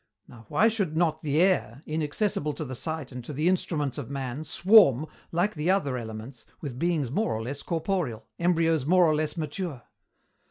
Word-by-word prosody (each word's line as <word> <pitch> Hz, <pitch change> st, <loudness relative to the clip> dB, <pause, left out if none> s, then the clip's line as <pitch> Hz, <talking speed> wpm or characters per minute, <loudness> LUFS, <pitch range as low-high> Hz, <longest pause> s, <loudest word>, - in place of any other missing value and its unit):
Now 115 Hz, -3 st, -15 dB
why 185 Hz, +10 st, +4 dB
should 200 Hz, -9 st, -1 dB
not 160 Hz, -2 st, +1 dB
the 150 Hz, 0 st, 0 dB
air, 180 Hz, -5 st, +2 dB
inaccessible 155 Hz, +1 st, -1 dB
to 155 Hz, -, -5 dB
the 130 Hz, -, -6 dB
sight 160 Hz, +1 st, -4 dB
and 125 Hz, -1 st, -7 dB
to 135 Hz, -, -7 dB
the 150 Hz, +5 st, 0 dB
instruments 150 Hz, -7 st, 0 dB
of 135 Hz, -, -6 dB
man, 135 Hz, 0 st, -4 dB
swarm, 160 Hz, -, +5 dB, 0.3 s
like 175 Hz, +5 st, +1 dB
the 155 Hz, +2 st, -2 dB
other 185 Hz, -9 st, +2 dB
elements, 115 Hz, +1 st, -7 dB, 0.2 s
with 130 Hz, -5 st, -6 dB
beings 160 Hz, -7 st, 0 dB
more 210 Hz, +10 st, 0 dB
or 110 Hz, -, -3 dB
less 140 Hz, +4 st, -5 dB
corporeal, 165 Hz, -, -2 dB
embryos 165 Hz, -3 st, +2 dB
more 180 Hz, +5 st, +5 dB
or 155 Hz, -, +3 dB
less 155 Hz, +1 st, -1 dB
mature?" 155 Hz, -3 st, -4 dB
155 Hz, 185 wpm, -27 LUFS, 135-175 Hz, 0.3 s, swarm